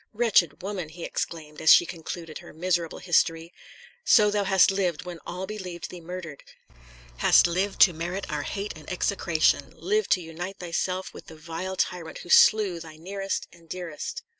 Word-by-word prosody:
Wretched 210 Hz, -7 st, +2 dB
woman!" 190 Hz, -5 st, -4 dB
he 170 Hz, +2 st, -10 dB
exclaimed, 155 Hz, -2 st, -5 dB
as 160 Hz, -, +6 dB
she -, -, +8 dB
concluded 165 Hz, -1 st, -7 dB
her -, -, -13 dB
miserable 170 Hz, 0 st, -1 dB
history, 165 Hz, -1 st, +1 dB, 0.5 s
"so 210 Hz, -2 st, +5 dB
thou 205 Hz, -1 st, 0 dB
hast 190 Hz, 0 st, +5 dB
lived, 180 Hz, -4 st, -1 dB
when 175 Hz, -2 st, -7 dB
all 180 Hz, +2 st, -4 dB
believed 185 Hz, -4 st, -7 dB
thee 180 Hz, -, -9 dB
murdered; 170 Hz, -4 st, -8 dB, 0.7 s
hast -, -, +6 dB
lived 185 Hz, +4 st, -1 dB
to 180 Hz, -, +8 dB
merit 175 Hz, +4 st, -4 dB
our 150 Hz, -1 st, -2 dB
hate 200 Hz, +7 st, -4 dB
and 155 Hz, +2 st, -10 dB
execration; 175 Hz, -3 st, +1 dB
lived 430 Hz, +1 st, 0 dB
to 185 Hz, -, +4 dB
unite 175 Hz, +4 st, -7 dB
thyself 185 Hz, +2 st, -3 dB
with -, -, -12 dB
the 160 Hz, -, -11 dB
vile 165 Hz, +4 st, -5 dB
tyrant 170 Hz, -3 st, -2 dB
who -, -, -12 dB
slew 200 Hz, -4 st, +5 dB
thy 160 Hz, -1 st, -10 dB
nearest 195 Hz, +4 st, -4 dB
and 165 Hz, -2 st, -20 dB
dearest!" 180 Hz, -, -6 dB
175 Hz, 170 wpm, -26 LUFS, 165-190 Hz, 0.7 s, she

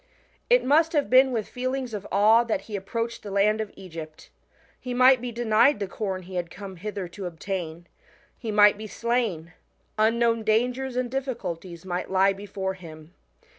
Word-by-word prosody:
It -, -, +4 dB
must 315 Hz, +4 st, +3 dB
have 290 Hz, -5 st, 0 dB
been 260 Hz, +1 st, +6 dB
with 225 Hz, -4 st, -2 dB
feelings 255 Hz, -1 st, -3 dB
of 205 Hz, -2 st, -5 dB
awe 215 Hz, +4 st, +5 dB
that 230 Hz, -, -1 dB
he 215 Hz, -, -7 dB
approached 230 Hz, +4 st, -4 dB
the 205 Hz, -, -8 dB
land 210 Hz, +2 st, +2 dB
of 215 Hz, -, -5 dB
Egypt. 165 Hz, -5 st, -10 dB, 0.5 s
He 250 Hz, -1 st, -5 dB
might 255 Hz, 0 st, +6 dB
be 245 Hz, -1 st, -4 dB
denied 230 Hz, +2 st, +3 dB
the 200 Hz, -, -1 dB
corn 190 Hz, -2 st, -4 dB
he 185 Hz, +2 st, -11 dB
had 175 Hz, -1 st, -3 dB
come 195 Hz, -1 st, -9 dB
hither 200 Hz, 0 st, -5 dB
to 185 Hz, +1 st, -6 dB
obtain, 170 Hz, -1 st, -5 dB, 0.5 s
he 230 Hz, -, -7 dB
might 210 Hz, -1 st, +5 dB
be 215 Hz, -, -6 dB
slain, 215 Hz, -8 st, -2 dB, 0.5 s
unknown 230 Hz, +1 st, +2 dB
dangers 245 Hz, +4 st, 0 dB
and 250 Hz, -1 st, -1 dB
difficulties 185 Hz, -10 st, -5 dB
might 180 Hz, -1 st, -3 dB
lie 195 Hz, +1 st, +3 dB
before 195 Hz, -1 st, -4 dB
him. 160 Hz, -2 st, -12 dB
210 Hz, 170 wpm, -25 LUFS, 190-240 Hz, 0.5 s, been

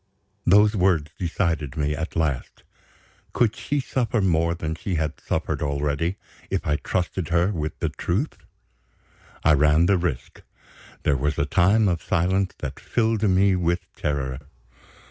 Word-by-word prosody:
Those 105 Hz, +4 st, +6 dB
words 90 Hz, -6 st, +2 dB
decided 80 Hz, -5 st, -1 dB
me 75 Hz, 0 st, 0 dB
at 80 Hz, +2 st, -5 dB
last. 75 Hz, -7 st, -2 dB, 0.7 s
Could 115 Hz, -3 st, +2 dB
she 145 Hz, 0 st, -2 dB
suffer 120 Hz, -3 st, -1 dB
more 85 Hz, -3 st, +2 dB
than 80 Hz, -2 st, -3 dB
she 90 Hz, +3 st, -3 dB
had 80 Hz, -1 st, -2 dB
suffered -, -, -2 dB
already, 75 Hz, +4 st, -1 dB, 0.3 s
if -, -, -2 dB
I 75 Hz, 0 st, +1 dB
trusted 90 Hz, +1 st, -2 dB
her 85 Hz, +3 st, +2 dB
with 75 Hz, -5 st, -3 dB
the -, -, -1 dB
truth? 105 Hz, -, -2 dB, 1.0 s
I 75 Hz, -, +5 dB
ran 75 Hz, +3 st, +4 dB
the 95 Hz, 0 st, +3 dB
risk. 80 Hz, -8 st, -4 dB, 0.6 s
There 70 Hz, -, +2 dB
was 75 Hz, +3 st, -1 dB
a 70 Hz, -, +1 dB
time 100 Hz, +7 st, +3 dB
of 85 Hz, -3 st, 0 dB
silence 95 Hz, +3 st, 0 dB
that -, -, -6 dB
filled 115 Hz, -2 st, 0 dB
me 95 Hz, -1 st, +4 dB
with 85 Hz, 0 st, 0 dB
terror. 65 Hz, -3 st, -2 dB
85 Hz, 145 wpm, -24 LUFS, 75-95 Hz, 1.0 s, Those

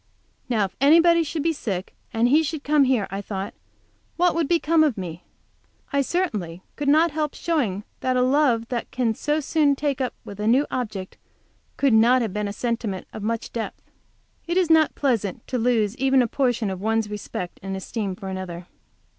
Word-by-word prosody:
Now 220 Hz, -5 st, +2 dB
if 190 Hz, -, -9 dB
anybody 335 Hz, +4 st, +6 dB
should 310 Hz, -1 st, -3 dB
be 330 Hz, 0 st, +2 dB
sick, 195 Hz, -, -4 dB, 0.2 s
and 230 Hz, +1 st, +2 dB
he 295 Hz, +6 st, +5 dB
should 315 Hz, -1 st, -4 dB
come 295 Hz, -1 st, +4 dB
here, 250 Hz, -6 st, +2 dB
I 195 Hz, +1 st, -3 dB
thought, 195 Hz, -1 st, -5 dB, 0.6 s
what 355 Hz, 0 st, +3 dB
would 330 Hz, -3 st, 0 dB
become 330 Hz, -1 st, +3 dB
of 290 Hz, -8 st, +1 dB
me? 175 Hz, -3 st, -6 dB, 0.7 s
I 280 Hz, -, +3 dB
certainly 210 Hz, -, -2 dB
could 290 Hz, -, -4 dB
not 315 Hz, +3 st, +4 dB
help 300 Hz, -1 st, -2 dB
showing 235 Hz, -, -1 dB, 0.2 s
that 255 Hz, -1 st, 0 dB
a 250 Hz, -, +3 dB
love 255 Hz, -4 st, +2 dB
that 245 Hz, -2 st, -3 dB
can 245 Hz, -3 st, 0 dB
so 295 Hz, +7 st, -1 dB
soon 295 Hz, -1 st, +2 dB
take 280 Hz, -2 st, -1 dB
up 255 Hz, -, -2 dB
with 200 Hz, 0 st, -9 dB
a 210 Hz, -, -1 dB
new 260 Hz, +6 st, +4 dB
object 210 Hz, -7 st, -4 dB, 0.6 s
could 275 Hz, -4 st, +3 dB
not 235 Hz, +3 st, +5 dB
have 215 Hz, -5 st, -3 dB
been 210 Hz, 0 st, -2 dB
a -, -, -3 dB
sentiment 225 Hz, -3 st, -3 dB
of 215 Hz, -, -6 dB
much 225 Hz, +2 st, -3 dB
depth. 230 Hz, -2 st, -6 dB, 0.6 s
It 345 Hz, +2 st, 0 dB
is 355 Hz, -3 st, +3 dB
not 320 Hz, -1 st, +4 dB
pleasant 225 Hz, -6 st, -1 dB
to 250 Hz, -, -1 dB
lose 225 Hz, -3 st, +1 dB
even 265 Hz, -1 st, +3 dB
a -, -, 0 dB
portion 240 Hz, -5 st, 0 dB
of 190 Hz, -1 st, -6 dB
one's 220 Hz, 0 st, +1 dB
respect 205 Hz, -3 st, -6 dB
and 195 Hz, 0 st, -4 dB
esteem 195 Hz, 0 st, -4 dB
for 195 Hz, -, -8 dB
another. 185 Hz, -2 st, -6 dB
245 Hz, 195 wpm, -24 LUFS, 205-295 Hz, 0.7 s, anybody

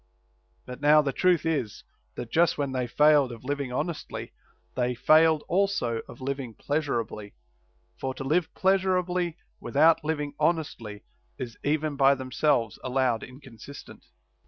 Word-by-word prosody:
But 125 Hz, +2 st, -9 dB
now 150 Hz, +1 st, +6 dB
the 135 Hz, -2 st, -2 dB
truth 180 Hz, -3 st, +2 dB
is, 145 Hz, -10 st, -2 dB, 0.3 s
that 120 Hz, -1 st, -7 dB
just 170 Hz, 0 st, +3 dB
when 140 Hz, -2 st, -2 dB
they 130 Hz, -1 st, -2 dB
failed 150 Hz, 0 st, +4 dB
of 115 Hz, 0 st, -10 dB
living 140 Hz, 0 st, -3 dB
hon 125 Hz, -, -1 dB
estly 170 Hz, -3 st, -7 dB, 0.4 s
they 125 Hz, 0 st, 0 dB
failed 155 Hz, +4 st, +4 dB
also 175 Hz, -, 0 dB
of -, -, -11 dB
living 135 Hz, -3 st, -4 dB
pleasurably; 120 Hz, -8 st, -3 dB, 0.6 s
for 130 Hz, -1 st, -3 dB
to -, -, -6 dB
live 160 Hz, +5 st, 0 dB
pleasurably 180 Hz, -3 st, +1 dB, 0.2 s
without 160 Hz, +3 st, +3 dB
living 150 Hz, -2 st, -2 dB
honestly 145 Hz, -10 st, -2 dB, 0.3 s
is 120 Hz, -4 st, -6 dB
even 150 Hz, 0 st, -1 dB
by 135 Hz, 0 st, +5 dB
themselves 130 Hz, -4 st, 0 dB
allowed 130 Hz, -3 st, 0 dB
inconsistent. 130 Hz, 0 st, -12 dB
140 Hz, 135 wpm, -27 LUFS, 125-160 Hz, 0.6 s, now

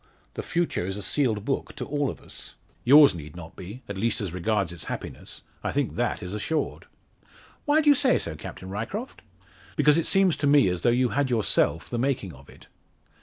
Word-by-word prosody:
The -, -, -4 dB
future 170 Hz, -, -1 dB
is 95 Hz, +2 st, -3 dB
a 105 Hz, -, -5 dB
sealed 110 Hz, -4 st, 0 dB
book 135 Hz, -, -2 dB
to -, -, -5 dB
all 145 Hz, -1 st, -1 dB
of -, -, -8 dB
us." -, -, -9 dB, 0.3 s
"Yours 145 Hz, +1 st, +8 dB
need 75 Hz, -2 st, -9 dB
not 85 Hz, -2 st, -10 dB
be 105 Hz, +8 st, -9 dB
at 100 Hz, -1 st, -5 dB
least 115 Hz, +1 st, 0 dB
as 95 Hz, -5 st, -4 dB
regards 95 Hz, 0 st, 0 dB
its 80 Hz, -3 st, -7 dB
happiness. -, -, -7 dB, 0.2 s
I -, -, -1 dB
think -, -, -1 dB
that -, -, -1 dB
is 90 Hz, -, -5 dB
assured." 150 Hz, +9 st, -2 dB, 0.8 s
"Why 300 Hz, +2 st, +4 dB
do 300 Hz, -, +3 dB
you -, -, +9 dB
say 275 Hz, -2 st, +3 dB
so, 80 Hz, -, -3 dB
Captain 95 Hz, +4 st, -8 dB
Ryecroft?" 125 Hz, -, -5 dB, 0.5 s
"Because 150 Hz, 0 st, +4 dB
it 165 Hz, -, -1 dB
seems 195 Hz, -3 st, +4 dB
to 145 Hz, -, 0 dB
me, 140 Hz, -8 st, +5 dB
as 90 Hz, -1 st, -2 dB
though 120 Hz, -, +3 dB
you 125 Hz, +1 st, +2 dB
had 140 Hz, 0 st, 0 dB
yourself 110 Hz, -7 st, +1 dB
the 120 Hz, -, -3 dB
making 125 Hz, -9 st, -1 dB
of 65 Hz, +1 st, -16 dB
it." -, -, -16 dB
120 Hz, 210 wpm, -26 LUFS, 95-145 Hz, 0.8 s, you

